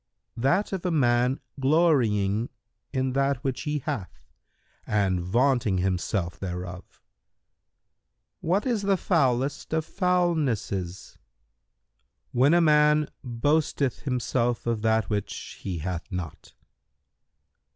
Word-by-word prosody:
"—"That 180 - +1
of 190 - -3
a 180 - 0
man 125 -4 +2 0.2
glorying 120 - +2 0.4
in 130 -1 -1
that 135 0 +1
which 135 -3 -2
he 150 - 0
hath 135 -9 -5 0.6
and 95 -3 +1
vaunting 115 +2 +2
himself 90 -1 -1
thereof." 90 -1 -5
Q - - -32 1.5
"What 190 +5 +2
is 235 -5 0
the 195 -1 +2
foulest 140 -5 0
of 160 -1 0
foulnesses?"—"When 120 - -2
a 175 - +5
man 150 -1 +4
boasteth 140 +2 0
himself 120 -2 -1
of 115 -2 -1
that 110 -1 +2
which 100 -2 -4
he 90 -3 -3
hath 90 +4 -5
not." 90 -3 -6
125 Hz, 105 wpm, -26 LUFS, 95-150 Hz, 1.5 s, a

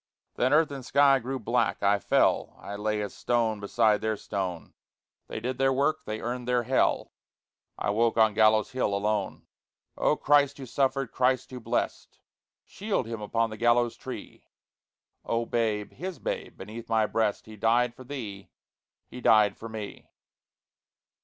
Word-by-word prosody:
Then 130 +1 +1
earth 150 0 +4
and 135 -2 -6
sky 140 +1 +4
grew 130 +3 -4
black, 120 -1 0
I 100 0 +3
fell - - +1
I 100 - -7
lay 105 0 -1
as 100 - -6
stone 115 -3 0
beside 105 +1 +2
their 110 -1 -1
stone. 95 -6 -4 0.5
They - - -5
did 125 +3 -4
their 135 0 +3
work. 145 +4 0
They 110 0 -4
earned 120 +1 -4
their 125 -1 +2
Hell. 130 +3 +1 0.7
I - - -1
woke 115 +2 +1
on 110 -1 +5
Gallows 110 0 +4
Hill, 125 -6 0
alone. 105 -1 -2 0.5
Oh - - +2
Christ 145 -1 +3
who 135 - -7
suffered, 135 0 0
Christ 130 0 +1
who 125 - -6
blessed, 115 - -3 0.5
Shield 205 - -2
him 115 -1 -6
upon 115 +2 0
the 110 - -7
gallows 120 0 +2
tree! - - -9 0.8
O 115 0 -1
babe, 110 -3 -1
his 185 -2 -6
babe, - - -5
beneath 110 +4 -9
my 110 -1 +3
breast, 110 -1 -1
He 110 - -11
died 115 +3 +2
for 130 - -12
thee! 110 -8 -7 0.6
he 125 - -10
died 105 -3 +5
for 115 - -9
me! 110 -2 -8
115 Hz, 160 wpm, -27 LUFS, 110-130 Hz, 0.8 s, on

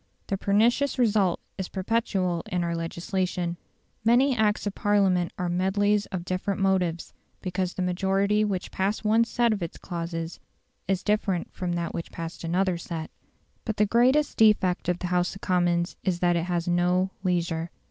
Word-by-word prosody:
The 195 - -1
pernicious 235 +9 +2
result 210 -7 +2 0.2
is 190 - -3
perpetual 190 -4 0
in 180 -1 0
our 170 0 -1
legislation; 175 +1 -2 0.5
many 250 +4 +4
Acts 215 -2 +1
of 205 - -2
Parliament 195 -5 +2
are 180 - -1
medleys 200 +4 +1
of 180 -2 -5
different 185 +2 -2
motives, 185 -4 0 0.3
because 185 0 -2
the 185 - -1
majority 195 +3 +1
which 195 -4 -2
passed 200 +3 -1
one 225 +2 +4
set 235 0 +2
of 205 - -4
its 170 - -5
clauses 165 -1 -5 0.5
is 190 -1 0
different 205 -4 0
from 180 -2 -3
that 170 -1 -2
which 170 - -5
passed 165 +1 -7
another 180 +1 0
set. 165 -2 -6 0.5
But 220 -2 -3
the 210 - +4
greatest 255 +7 +3
defect 205 -5 +3
of 180 - +1
the 180 - -5
House 180 +1 +1
of 195 - -11
Commons 175 -1 +1
is 185 -3 0
that 175 -1 +3
it 170 0 0
has 175 -1 -1
no 180 +2 +2
leisure. 170 -2 0
185 Hz, 170 wpm, -26 LUFS, 175-205 Hz, 0.5 s, many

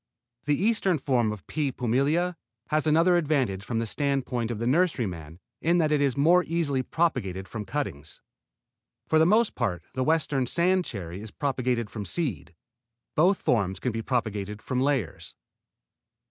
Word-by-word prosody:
The 145 -1 +1
eastern 195 -4 +2
form, 120 -6 0
P. 145 - -1
pumila, 140 +9 +1 0.3
has 155 0 +1
another 165 +3 +4
advantage 135 - 0
from 115 +1 -3
the 115 - 0
standpoint 130 -2 -1
of 120 - -3
the 115 - -3
nurseryman 110 - 0 0.2
in 170 +2 +3
that 155 -3 +2
it 150 -1 +2
is 140 -3 +1
more 170 +5 +5
easily 155 -5 0
propagated 95 - -1
from 110 0 -6
cuttings. 100 - -4 0.9
For 160 - +3
the 160 - +5
most 220 +3 +3
part 105 -8 -2
the 130 0 -1
western 150 -4 +1
sand 180 +5 +2
cherry 95 -4 -6
is 110 - -8
propagated 125 -4 -1
from 105 -3 -5
seed. 90 - -3 0.6
Both 180 +5 +3
forms 95 -6 +1
can 125 - -1
be 115 0 -3
propagated 105 -4 -2
from 130 +2 -2
layers. 135 - -1
130 Hz, 155 wpm, -27 LUFS, 110-160 Hz, 0.9 s, more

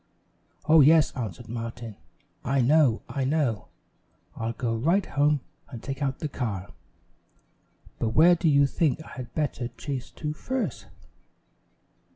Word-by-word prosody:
"Oh, 155 0 +7
yes," 155 +2 +6
answered 110 -10 -5
Martin, 115 -1 -6 0.5
"I 135 +2 +1
know. 135 -2 +3
I 140 - -3
know. 135 -6 0 0.7
I'll 115 0 -3
go 115 -2 -2
right 170 - +2
home 145 0 +1 0.3
and 120 -5 -9
take 135 0 -5
out 135 -2 -1
the 155 - -3
car 105 -9 -4 1.3
but 115 - 0
where 170 +3 +7
do 170 -1 +1
you 140 -1 +5
think 155 +1 0
I - - -12
had 125 -3 -9
better 145 -5 -1
chase 125 +1 -6
to 150 -1 -5
first?" 260 +11 -4
135 Hz, 140 wpm, -26 LUFS, 120-155 Hz, 1.3 s, Oh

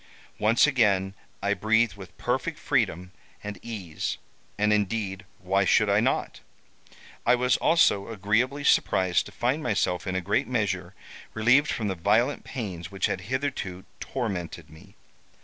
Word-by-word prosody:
Once 110 +3 +4
again 105 -9 +2 0.3
I 100 - +2
breathed 110 +1 +2
with 95 -3 -12
perfect - - -2
freedom 90 +2 -1 0.3
and 105 -2 -6
ease—and 105 +1 -4
indeed 105 -1 -1
why 95 +2 +1
should 100 +2 +3
I 100 - +4
not? 130 +5 -1 0.8
I - - +4
was 125 +1 +2
also 105 -12 +3
agreeably 115 +7 0
surprised 95 -9 +2
to - - -11
find 130 +6 -1
myself, 100 - -1
in 95 - -2
a - - +1
great 100 +9 0
measure, 115 -5 -2 0.4
relieved 125 +7 +4
from 110 - -2
the 95 - 0
violent 105 +10 +1
pains 95 - -6
which 95 -2 -1
had 95 - -2
hitherto 130 -9 -3
tormented 90 - -4
me. 95 +6 -16
105 Hz, 140 wpm, -26 LUFS, 95-120 Hz, 0.8 s, Once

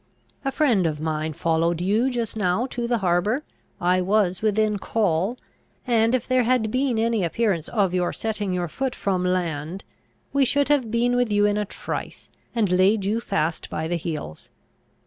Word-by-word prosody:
A 270 - 0
friend 245 - +2
of 150 -2 -3
mine 155 0 -2
followed 165 +1 +1
you 210 +8 +2
just 235 -4 -3
now 205 +2 +1
to 240 -1 -2
the 240 0 +1
harbour; 195 - +1 0.4
I 180 +1 +2
was 185 -1 +1
within 215 -1 +1
call; 200 +2 0 0.5
and, 230 -1 +3
if 255 - -2
there 255 0 +3
had 240 -3 +1
been 255 -1 +1
any 225 -2 +1
appearance 175 -2 0
of 200 -5 +1
your 180 -1 +1
setting 210 -3 -2
your 180 -1 -1
foot 260 - -3
from 185 -2 -1
land, 175 -1 -2 0.5
we 280 -1 +4
should 285 +2 +2
have 275 -6 +2
been 240 +2 +1
with 245 -3 +1
you 205 0 +3
in 205 0 +2
a 210 0 0
trice, - - -6 0.2
and 215 -5 +1
laid 190 +3 +3
you 215 +3 +1
fast 160 -5 -2
by 160 +1 -3
the 175 - -1
heels. 155 - -5
205 Hz, 180 wpm, -24 LUFS, 175-235 Hz, 0.5 s, we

